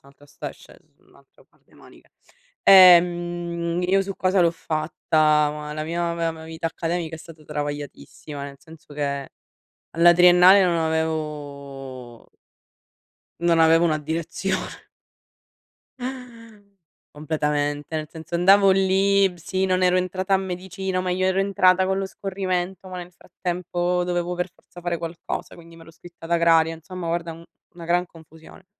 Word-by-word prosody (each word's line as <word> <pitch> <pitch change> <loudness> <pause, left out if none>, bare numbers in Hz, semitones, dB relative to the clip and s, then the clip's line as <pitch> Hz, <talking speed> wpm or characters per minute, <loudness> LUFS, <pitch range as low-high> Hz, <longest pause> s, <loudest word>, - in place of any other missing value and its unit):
un'altra 140 +1 -20
sta 145 - -8
sc - - -19
es - - -16
è - - -31
un - - -27
altro - - -24
par - - -35
de - - -27
manica. - - -19 0.6
Ehm, 175 -2 +5
io 195 +1 +3
su 195 0 -6
cosa 185 0 +1
l'ho 170 - +4
fatta? 155 -1 +1
Ma 150 0 -7
la 155 - -4
mia 170 +1 -2
me 165 -1 -3
vita 165 +1 -5
accademica 165 0 -3
è - - -9
stata 160 -1 -14
travagliatissima, 145 0 -6
nel 140 -1 -9
senso 160 -2 -16
che 140 -1 -3 0.6
alla 170 +1 +5
triennale 180 +2 +7
non 175 -2 +1
avevo 145 -6 -5 1.1
non 170 -1 +2
avevo 165 +1 +5
una 155 -2 +1
direzione. 165 +5 -4 2.3
Completamente, 150 0 -2
nel 155 -1 -3
senso 160 +2 -7
andavo 195 +3 +5
lì, 195 +1 +3
b - - -15
sì 185 +3 -2
non 185 -1 0
ero 180 0 +3
entrata 185 +2 0
a - - +3
medicina, 190 0 -4
ma 185 - -3
io 185 +1 0
ero 190 +1 +1
entrata 190 -1 +3
con 190 0 0
lo 195 - -2
scorrimento, 190 -1 -4
ma 185 -1 -7
nel 175 0 -8
frattempo 180 0 -3
dovevo 175 0 -2
per 180 +1 -3
forza 175 - -16
fare 175 -1 -3
qualcosa, 165 0 -6
quindi 170 0 -15
m'ero 165 0 -15
iscritta 170 0 -14
ad 170 - -8
agraria, 165 -1 +3
insomma 175 +2 -8
guarda 170 0 -2
un 165 +1 -11 0.3
una 170 -2 -11
gran 175 +1 +1
confusione. 160 +2 -17
170 Hz, 155 wpm, -23 LUFS, 160-185 Hz, 2.3 s, triennale